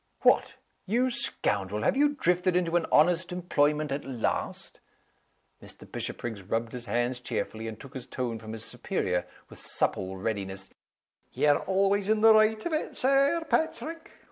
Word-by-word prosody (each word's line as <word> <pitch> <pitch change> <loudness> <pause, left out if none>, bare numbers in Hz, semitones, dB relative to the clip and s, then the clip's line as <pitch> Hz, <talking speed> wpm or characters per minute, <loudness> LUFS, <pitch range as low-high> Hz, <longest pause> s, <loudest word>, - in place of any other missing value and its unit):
"What, - - +3 0.3
you 245 +6 +2
scoundrel! 105 - 0
have - - +2
you 290 +1 +3
drifted 180 -6 +1
into 175 -2 +1
an 170 -2 +2
honest 175 +3 +4
employment 150 -4 +1
at 140 +1 -2
last?" 125 -4 -3 0.8
Mr. - - -13
Bishopriggs 110 -4 -5
rubbed 115 +4 -2
his 120 -1 -6
hands 120 +3 0
cheerfully, 115 -2 -4
and 110 -1 -7
took 135 0 -12
his 130 -3 -7
tone 120 -3 -3
from 110 0 -8
his 110 0 -5
superior, 90 -1 -2 0.2
with - - -13
supple 95 0 -1
readiness, 95 -2 -4 0.6
"Ye're 145 -1 +3
always 195 +1 +2
in 215 0 +3
the 225 0 +8
right 215 0 +3
of 345 - -2
it, 310 - -2
Sir 275 +5 +3
Paitrick! 320 +1 -2
150 Hz, 155 wpm, -28 LUFS, -, 0.8 s, the